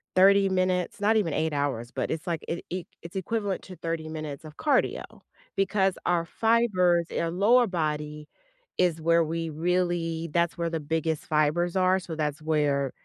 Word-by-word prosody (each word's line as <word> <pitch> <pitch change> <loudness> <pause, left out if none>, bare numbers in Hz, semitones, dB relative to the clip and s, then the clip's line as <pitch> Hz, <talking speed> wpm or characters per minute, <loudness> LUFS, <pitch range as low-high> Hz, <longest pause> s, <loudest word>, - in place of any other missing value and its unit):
30 195 +1 +6
minutes 185 -1 0
not 220 +2 +4
even 175 -8 0
8 160 -1 0
hours, 140 -5 -1
but 130 -2 -2
it's 160 +2 -4
like, 170 -2 -2
it 170 - -3
e 180 0 -3 0.2
it's 170 +2 -11
equivalent 200 0 -2
to 185 - -10
30 165 -2 -4
minutes 155 -2 -6
of 155 0 -11
cardio, 290 -4 +1 0.5
because 195 -1 +1
our 175 -1 +2
fibers 185 -5 +2
in - - -3
our 165 - -1
lower 225 +8 +4
body 150 -4 -3 0.5
is 170 -3 +1
where 165 +1 +4
we 165 +1 -3
really 170 0 -1
that's 170 -1 +1
where 170 -1 -1
the 165 -1 -2
biggest 160 +1 -2
fibers 155 +3 +1
are. 185 0 +3
So, 175 -3 -7
that's 150 0 -2
where 145 -4 +1
170 Hz, 175 wpm, -27 LUFS, 155-185 Hz, 0.5 s, 30